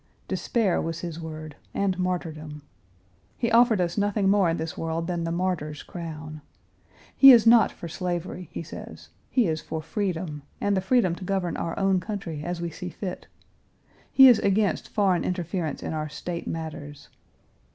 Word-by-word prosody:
Despair 220 Hz, -7 st, 0 dB
was 165 Hz, 0 st, -4 dB
his 170 Hz, -2 st, -5 dB
word, 155 Hz, -2 st, -7 dB, 0.2 s
and 190 Hz, -2 st, 0 dB
martyrdom. 155 Hz, -5 st, -3 dB, 0.7 s
He 235 Hz, -1 st, -1 dB
offered 230 Hz, -2 st, +5 dB
us 175 Hz, +2 st, 0 dB
nothing 205 Hz, -1 st, +1 dB
more 195 Hz, -3 st, +4 dB
in 165 Hz, -, 0 dB
this 160 Hz, 0 st, -4 dB
world 165 Hz, 0 st, -2 dB
than 170 Hz, -1 st, -2 dB
the 165 Hz, -, -2 dB
martyr's 170 Hz, -4 st, -2 dB
crown. 155 Hz, -3 st, -7 dB, 0.7 s
He 270 Hz, -1 st, +10 dB
is 235 Hz, -3 st, +7 dB
not 230 Hz, 0 st, +6 dB
for 170 Hz, -, -8 dB
slavery, 180 Hz, 0 st, -4 dB
he -, -, -5 dB
says; 160 Hz, -, -10 dB, 0.2 s
he 250 Hz, -4 st, +3 dB
is 160 Hz, -3 st, -1 dB
for 160 Hz, -, -5 dB
freedom, 165 Hz, -2 st, -3 dB, 0.2 s
and 205 Hz, 0 st, +1 dB
the 190 Hz, -, +1 dB
freedom 190 Hz, -3 st, +2 dB
to 180 Hz, -, -8 dB
govern 185 Hz, -3 st, -1 dB
our 165 Hz, -, -3 dB
own 195 Hz, -1 st, +2 dB
country 180 Hz, -7 st, -5 dB
as 175 Hz, +1 st, -3 dB
we 170 Hz, -1 st, -3 dB
see 180 Hz, +3 st, -6 dB
fit. 180 Hz, +1 st, -6 dB, 0.8 s
He 265 Hz, -1 st, +9 dB
is 240 Hz, -4 st, +7 dB
against 200 Hz, +1 st, +1 dB
foreign 195 Hz, -4 st, +2 dB
interference 175 Hz, -2 st, -3 dB
in -, -, -3 dB
our 155 Hz, -1 st, -3 dB
State 170 Hz, +3 st, -5 dB
matters. 150 Hz, -3 st, -6 dB
175 Hz, 170 wpm, -26 LUFS, 160-195 Hz, 0.8 s, He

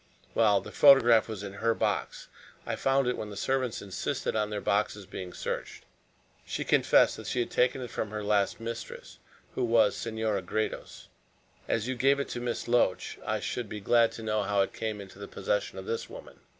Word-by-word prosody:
"Well, 105 Hz, -3 st, +4 dB
the -, -, -10 dB
photograph 120 Hz, -6 st, +6 dB
was 105 Hz, -2 st, -5 dB
in 100 Hz, -1 st, -6 dB
her 115 Hz, 0 st, +2 dB
box. -, -, -2 dB, 0.4 s
I -, -, -2 dB
found 135 Hz, 0 st, +2 dB
it 125 Hz, -, +1 dB
when 105 Hz, -, -5 dB
the 100 Hz, -, -8 dB
servants 130 Hz, 0 st, -1 dB
insisted 95 Hz, +2 st, -3 dB
on 105 Hz, -1 st, 0 dB
their 105 Hz, -1 st, -3 dB
boxes 100 Hz, 0 st, 0 dB
being 95 Hz, -1 st, -7 dB
searched. -, -, -5 dB, 0.6 s
She -, -, -3 dB
confessed -, -, +4 dB
that -, -, -8 dB
she 125 Hz, -, -1 dB
had 120 Hz, -, -1 dB
taken 125 Hz, +1 st, +2 dB
it 125 Hz, -, -6 dB
from 110 Hz, -, -3 dB
her 105 Hz, 0 st, -5 dB
last 100 Hz, -1 st, +1 dB
mistress, 115 Hz, -, -7 dB, 0.3 s
who 130 Hz, -, -1 dB
was 115 Hz, -3 st, +4 dB
Senora 110 Hz, -3 st, -2 dB
Gredos. 110 Hz, +4 st, -4 dB, 0.6 s
As 115 Hz, +1 st, 0 dB
you 130 Hz, -, -1 dB
gave 135 Hz, +3 st, +3 dB
it 140 Hz, -, -3 dB
to -, -, -4 dB
Miss 120 Hz, -1 st, -3 dB
Loach, 120 Hz, -6 st, +1 dB
I -, -, -1 dB
should 120 Hz, -4 st, -4 dB
be 105 Hz, -, -5 dB
glad 115 Hz, +3 st, +4 dB
to 115 Hz, -, -8 dB
know 110 Hz, -1 st, 0 dB
how 100 Hz, 0 st, +1 dB
it 95 Hz, -, -1 dB
came 110 Hz, -2 st, -3 dB
into 95 Hz, 0 st, -12 dB
the 100 Hz, -, -7 dB
possession -, -, -2 dB
of -, -, -7 dB
this 460 Hz, 0 st, -3 dB
woman." -, -, -11 dB
110 Hz, 200 wpm, -29 LUFS, 105-125 Hz, 0.6 s, photograph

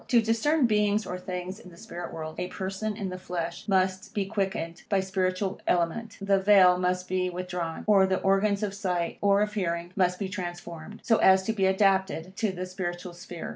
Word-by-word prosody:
To 240 Hz, -, +5 dB
discern 230 Hz, +7 st, +2 dB
beings 210 Hz, -1 st, +2 dB
or 180 Hz, -, -5 dB
things 180 Hz, +2 st, -5 dB
in 185 Hz, -, -13 dB
the 170 Hz, -, -16 dB
spirit 175 Hz, 0 st, -7 dB
world, 155 Hz, -1 st, -6 dB
a 180 Hz, -, -2 dB
person 195 Hz, +3 st, -4 dB
in 200 Hz, -4 st, -3 dB
the 185 Hz, 0 st, -6 dB
flesh 175 Hz, 0 st, -5 dB
must 185 Hz, -1 st, 0 dB
be 200 Hz, -2 st, 0 dB
quickened 190 Hz, -4 st, -3 dB
by 200 Hz, -, +3 dB
spiritual 190 Hz, +1 st, -1 dB
element, 180 Hz, +6 st, 0 dB
the 195 Hz, -1 st, +2 dB
vail 190 Hz, -2 st, +6 dB
must 180 Hz, 0 st, 0 dB
be 185 Hz, 0 st, 0 dB
withdrawn, 180 Hz, -2 st, -4 dB
or 195 Hz, -2 st, +5 dB
the 190 Hz, 0 st, +1 dB
organs 200 Hz, +1 st, +2 dB
of 200 Hz, -2 st, -2 dB
sight, 180 Hz, -4 st, -2 dB
or 200 Hz, 0 st, +4 dB
of 210 Hz, 0 st, -3 dB
hearing, 170 Hz, -3 st, -2 dB
must 180 Hz, -2 st, +2 dB
be 195 Hz, -, -3 dB
transformed, 175 Hz, 0 st, -7 dB
so 225 Hz, -, +3 dB
as 190 Hz, 0 st, +5 dB
to 220 Hz, -, -1 dB
be 195 Hz, -3 st, +2 dB
adapted 190 Hz, -2 st, +1 dB
to 220 Hz, -3 st, 0 dB
the 185 Hz, 0 st, -5 dB
spiritual 180 Hz, -1 st, -5 dB
sphere. 175 Hz, -1 st, -8 dB
190 Hz, 200 wpm, -27 LUFS, 180-200 Hz, -, vail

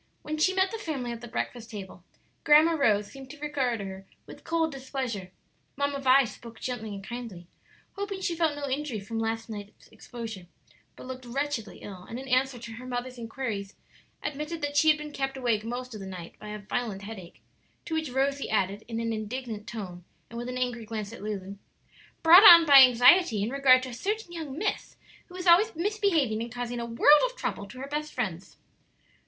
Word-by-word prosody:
When 310 Hz, +1 st, -4 dB
she 375 Hz, +4 st, +3 dB
met 380 Hz, 0 st, +2 dB
the 450 Hz, -, -5 dB
family 280 Hz, -, -4 dB
at 235 Hz, -1 st, -7 dB
the 240 Hz, -, -8 dB
breakfast 235 Hz, 0 st, -4 dB
table 195 Hz, -4 st, -9 dB, 0.4 s
Grandma 305 Hz, +3 st, +6 dB
Rose 215 Hz, -10 st, +2 dB
seemed 270 Hz, -1 st, -11 dB
to 300 Hz, -, -10 dB
regard 270 Hz, -6 st, -1 dB
her 190 Hz, 0 st, -8 dB, 0.2 s
with -, -, -13 dB
cold 325 Hz, -1 st, 0 dB
displeasure; 260 Hz, -8 st, -5 dB, 0.5 s
"Mamma 280 Hz, 0 st, -1 dB
Vi" 270 Hz, 0 st, +5 dB
spoke 230 Hz, 0 st, -11 dB
gently 245 Hz, -4 st, -4 dB
and 195 Hz, -, -8 dB
kindly; 230 Hz, -6 st, -7 dB, 0.5 s
hoping 400 Hz, -1 st, -4 dB
she 350 Hz, -3 st, -2 dB
felt 325 Hz, -3 st, +1 dB
no 290 Hz, -1 st, -4 dB
injury 270 Hz, -4 st, -2 dB
from 225 Hz, +3 st, -5 dB
last 225 Hz, 0 st, -2 dB
night's 205 Hz, -2 st, -9 dB
exposure, 225 Hz, -7 st, -8 dB, 0.5 s
but -, -, -11 dB
looked 255 Hz, 0 st, -8 dB
wretchedly 260 Hz, -4 st, -3 dB
ill; 190 Hz, -3 st, -8 dB
and 230 Hz, -, -5 dB
in 265 Hz, +1 st, -8 dB
answer 260 Hz, 0 st, +1 dB
to 230 Hz, -1 st, -9 dB
her 250 Hz, +3 st, -9 dB
mother's 250 Hz, 0 st, -4 dB
inquiries 225 Hz, -4 st, -5 dB, 0.5 s
admitted 300 Hz, +2 st, -4 dB
that 290 Hz, 0 st, -2 dB
she 315 Hz, -, +4 dB
had 305 Hz, -, +5 dB
been 300 Hz, 0 st, -7 dB
kept 270 Hz, -1 st, -3 dB
awake 235 Hz, -5 st, 0 dB
most 245 Hz, +2 st, -5 dB
of 215 Hz, -, -7 dB
the 195 Hz, -, -7 dB
night 180 Hz, -3 st, -8 dB
by 215 Hz, -, -10 dB
a 210 Hz, 0 st, -5 dB
violent 205 Hz, -1 st, -4 dB
headache, 195 Hz, -5 st, -10 dB, 0.4 s
to 330 Hz, -, -5 dB
which 315 Hz, -2 st, -1 dB
Rosie 275 Hz, +2 st, 0 dB
added, 200 Hz, 0 st, 0 dB
in 230 Hz, -1 st, -4 dB
an 230 Hz, 0 st, -1 dB
indignant 220 Hz, 0 st, -5 dB
tone, 185 Hz, -7 st, -7 dB, 0.3 s
and 235 Hz, -, -6 dB
with 240 Hz, +1 st, -5 dB
an 250 Hz, -, -4 dB
angry 245 Hz, -2 st, -2 dB
glance 215 Hz, -1 st, -5 dB
at 235 Hz, -, -10 dB
Lulu: 200 Hz, -2 st, -5 dB, 0.7 s
"Brought 335 Hz, +4 st, +10 dB
on 340 Hz, -5 st, +11 dB
by 280 Hz, -3 st, +10 dB
anxiety 250 Hz, -, +6 dB
in 220 Hz, -, -2 dB
regard 265 Hz, -2 st, +5 dB
to 260 Hz, -, -5 dB
a -, -, -8 dB
certain 405 Hz, -, -3 dB
young 315 Hz, -5 st, -6 dB
miss 410 Hz, +4 st, -3 dB, 0.3 s
who 360 Hz, -, -14 dB
is 365 Hz, 0 st, -6 dB
always 370 Hz, +5 st, +5 dB
misbehaving 335 Hz, -, +1 dB
and 235 Hz, 0 st, -5 dB
causing 245 Hz, 0 st, -4 dB
a 235 Hz, -, -4 dB
world 290 Hz, +6 st, +6 dB
of -, -, -14 dB
trouble 200 Hz, -, -4 dB
to 205 Hz, -, -12 dB
her 270 Hz, -, -5 dB
best 300 Hz, +1 st, -3 dB
friends." 190 Hz, -7 st, -4 dB
250 Hz, 205 wpm, -28 LUFS, 220-295 Hz, 0.7 s, on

